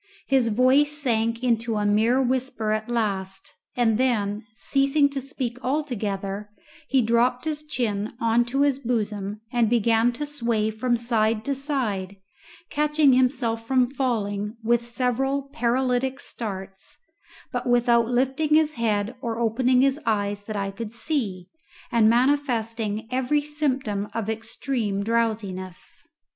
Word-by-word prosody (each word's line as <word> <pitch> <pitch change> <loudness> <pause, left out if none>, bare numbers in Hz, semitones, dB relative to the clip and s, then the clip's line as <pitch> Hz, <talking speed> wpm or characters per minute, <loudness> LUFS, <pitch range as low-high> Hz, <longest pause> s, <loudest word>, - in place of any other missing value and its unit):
His 265 -3 +2
voice 260 +6 +3
sank 230 -3 0
into 230 -2 +1
a 210 -1 0
mere 220 +5 +3
whisper 255 -4 0
at 215 +1 -2
last, 195 -5 -2 0.2
and 225 -2 +2
then, 215 -4 0
ceasing 275 +4 +2
to 280 -1 -4
speak 255 -2 -4
altogether, 210 -8 -2 0.4
he 265 -2 +3
dropped 240 +3 +2
his 305 -1 -3
chin 225 -8 -2
on 230 +1 +3
to 270 +3 -1
his 285 -2 +2
bosom 210 -4 -2
and 235 -3 +3
began 230 0 +3
to 295 +5 -4
sway 235 -7 -1
from 240 +2 0
side 225 -2 +1
to 280 - 0
side, 245 - -2 0.6
catching 300 -2 +3
himself 245 -3 +1
from 255 -1 +2
falling 215 -5 -2
with 235 +1 +2
several 255 +3 0
paralytic 255 +2 0
starts, 195 -6 -7 0.5
but - - -2
without 240 -1 +3
lifting 265 +5 +1
his 310 -1 +3
head 220 -2 0
or 230 -3 -3
opening 250 +2 +2
his 275 +2 +2
eyes 205 -2 0
that 215 - -5
I 195 -1 -2
could 215 +2 -7
see, 225 - -2 0.5
and 225 -2 +5
manifesting 230 -4 0
every 260 +4 +1
symptom 265 -9 -1
of 225 -1 -1
extreme 225 -2 -2
drowsiness. 210 -5 -2
235 Hz, 135 wpm, -24 LUFS, 215-260 Hz, 0.6 s, and